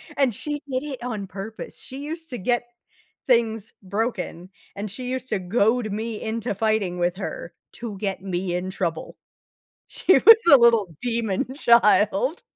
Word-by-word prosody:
And 270 Hz, -4 st, +2 dB
she 295 Hz, +7 st, -4 dB
did 255 Hz, +1 st, -1 dB
it 275 Hz, -5 st, -7 dB
on 215 Hz, -5 st, -4 dB
purpose, 200 Hz, +3 st, -8 dB
she 270 Hz, +2 st, -7 dB
used 325 Hz, +2 st, -6 dB
to 250 Hz, -, -4 dB
get 240 Hz, +5 st, 0 dB, 0.6 s
things 225 Hz, -4 st, +1 dB
broken, 190 Hz, -3 st, -3 dB, 0.3 s
and 205 Hz, +1 st, -5 dB
she 250 Hz, +4 st, -5 dB
used 260 Hz, 0 st, -3 dB
to 215 Hz, -, 0 dB
goad 215 Hz, +4 st, +1 dB
me 220 Hz, +1 st, -4 dB
into 225 Hz, 0 st, -3 dB
fighting 200 Hz, -3 st, 0 dB
with 175 Hz, +1 st, 0 dB
her 195 Hz, -, -6 dB, 0.2 s
to 220 Hz, -4 st, -7 dB
get 195 Hz, -1 st, -3 dB
me 180 Hz, -1 st, -3 dB
in 180 Hz, +1 st, -3 dB
trouble. 170 Hz, -4 st, -4 dB, 0.7 s
She 370 Hz, -, +2 dB
was 450 Hz, -, +8 dB
a 280 Hz, -, +10 dB
little 230 Hz, -8 st, +3 dB
demon 235 Hz, +1 st, -1 dB
child. 235 Hz, -, +3 dB
220 Hz, 160 wpm, -23 LUFS, 195-250 Hz, 0.7 s, a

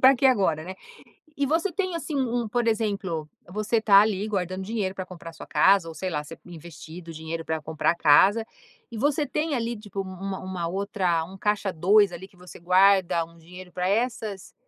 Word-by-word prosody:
pra 260 Hz, +1 st, +7 dB
que 270 Hz, -, +3 dB
agora, 190 Hz, -, +2 dB
né? 185 Hz, +2 st, -7 dB, 0.6 s
E 280 Hz, 0 st, +1 dB
você 330 Hz, +5 st, 0 dB
tem 370 Hz, -1 st, -2 dB
assim 320 Hz, -1 st, -5 dB
um 245 Hz, -3 st, 0 dB
um, -, -, -5 dB
por 240 Hz, +1 st, 0 dB
exemplo, 200 Hz, -8 st, -1 dB, 0.2 s
você 215 Hz, +4 st, 0 dB
tá 200 Hz, -2 st, +7 dB
ali 205 Hz, -1 st, +1 dB
guardando 185 Hz, -2 st, -2 dB
dinheiro 200 Hz, -2 st, -2 dB
para 185 Hz, -1 st, -5 dB
comprar 170 Hz, -2 st, -10 dB
a -, -, -17 dB
sua 160 Hz, -, -11 dB
casa 190 Hz, -3 st, +4 dB
ou 165 Hz, -, -8 dB
sei 185 Hz, +2 st, -4 dB
lá, 150 Hz, -2 st, -2 dB
você 165 Hz, +2 st, -11 dB
investido 165 Hz, 0 st, -10 dB
dinheiro 160 Hz, +1 st, -5 dB
para 160 Hz, -1 st, -2 dB
comprar 160 Hz, 0 st, 0 dB
a -, -, -7 dB
casa 190 Hz, +9 st, +5 dB, 0.5 s
e 230 Hz, -, -7 dB
você 290 Hz, +3 st, +1 dB
tem 300 Hz, +3 st, -1 dB
ali 235 Hz, -1 st, -2 dB
tipo 205 Hz, -2 st, -6 dB
uma 190 Hz, 0 st, -6 dB
uma 185 Hz, -2 st, -4 dB
outra, 185 Hz, -3 st, 0 dB
um 190 Hz, +3 st, -12 dB
caixa 205 Hz, -1 st, 0 dB
2 195 Hz, +3 st, +4 dB
ali 185 Hz, +3 st, -8 dB
que 185 Hz, -, -25 dB
você 180 Hz, 0 st, -13 dB
guarda 185 Hz, -1 st, +4 dB
um 170 Hz, +1 st, -18 dB
dinheiro 180 Hz, +2 st, -12 dB
pra 180 Hz, 0 st, -1 dB
essas 215 Hz, -2 st, -2 dB
190 Hz, 210 wpm, -25 LUFS, 170-220 Hz, 0.6 s, pra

